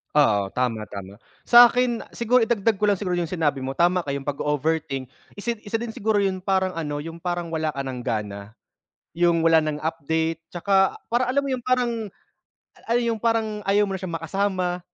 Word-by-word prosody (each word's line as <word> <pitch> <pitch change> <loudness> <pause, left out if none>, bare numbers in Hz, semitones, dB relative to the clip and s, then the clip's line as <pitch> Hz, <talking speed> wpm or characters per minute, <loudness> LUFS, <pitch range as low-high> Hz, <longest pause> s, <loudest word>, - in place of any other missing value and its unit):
Oo 105 -9 +3
tama, 120 -4 -1
tama. 100 0 -8 0.3
Sakin 240 0 +6
siguro 235 +1 +2
idagdag 225 -1 +1
ko 200 - -8
lang 205 -2 +3
siguro 180 -3 -1
yung 170 -1 -2
sinabi 145 -6 0
mo 135 - -2
tama 175 +4 +2
ka 140 - -4
yung 140 0 -5
pag-o-overthink 145 -1 -1 0.3
isa 235 +3 -2
isa 220 +2 -2
din 235 -1 -6
siguro 215 0 +1
yung 190 -2 -1
parang 190 -1 +1
ano 150 -3 -3
yung 165 +2 -7
parang 175 -1 -2
wala 160 -1 -1
ka 140 - -7
ng 130 -2 -4
gana, 105 -1 -4 0.7
yung 170 -1 +3
wala 160 -1 +4
ng 150 -1 -3
update 160 +1 -2
tsaka 195 +2 +2 0.2
parang 245 +2 +1
alam 280 - +3
mo 280 - -5
yung 245 - -10
parang 250 -1 +2 1.1
yung 230 -2 0
parang 225 -2 0
ayaw 205 +1 +4
mo 195 - -3
na 190 - -4
siyang 170 -3 -4
makasama, 180 +1 -1
175 Hz, 185 wpm, -24 LUFS, 150-210 Hz, 1.1 s, Sakin